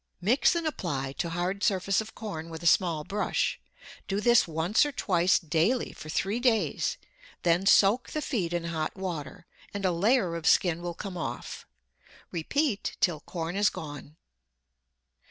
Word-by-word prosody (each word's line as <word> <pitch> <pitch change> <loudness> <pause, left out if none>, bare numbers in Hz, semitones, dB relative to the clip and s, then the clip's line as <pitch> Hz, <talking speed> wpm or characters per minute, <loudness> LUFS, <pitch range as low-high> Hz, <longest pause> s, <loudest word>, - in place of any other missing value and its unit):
Mix 230 - +3
and 340 -1 -1
apply 150 - -2
to 170 - -1
hard 180 +4 -2
surface 195 0 +2
of 220 +1 -10
corn 165 -7 -6
with 165 0 -8
a - - -6
small 165 -2 +3
brush. 205 +6 -1 0.5
Do 195 0 -1
this 240 -1 +4
once 165 - +2
or 295 - -1
twice 185 -8 +2
daily 170 +10 0
for 155 - -10
three 195 +8 -1
days, 240 -3 +1 0.5
then 175 +3 +2
soak 210 +5 +5
the 305 - -3
feet 190 - -1
in 175 -1 -1
hot 160 -2 -3
water, 175 -6 -5 0.3
and 200 -1 -2
a 185 - +3
layer 195 +1 +2
of 165 -2 -3
skin 175 -2 +3
will 175 -1 -4
come 190 -1 -6
off. 170 - -6 0.6
Repeat 210 - -1
till 170 -5 +2
corn 165 +2 -5
is 205 +1 +4
gone. 145 -1 -8
180 Hz, 160 wpm, -28 LUFS, 165-210 Hz, 0.6 s, soak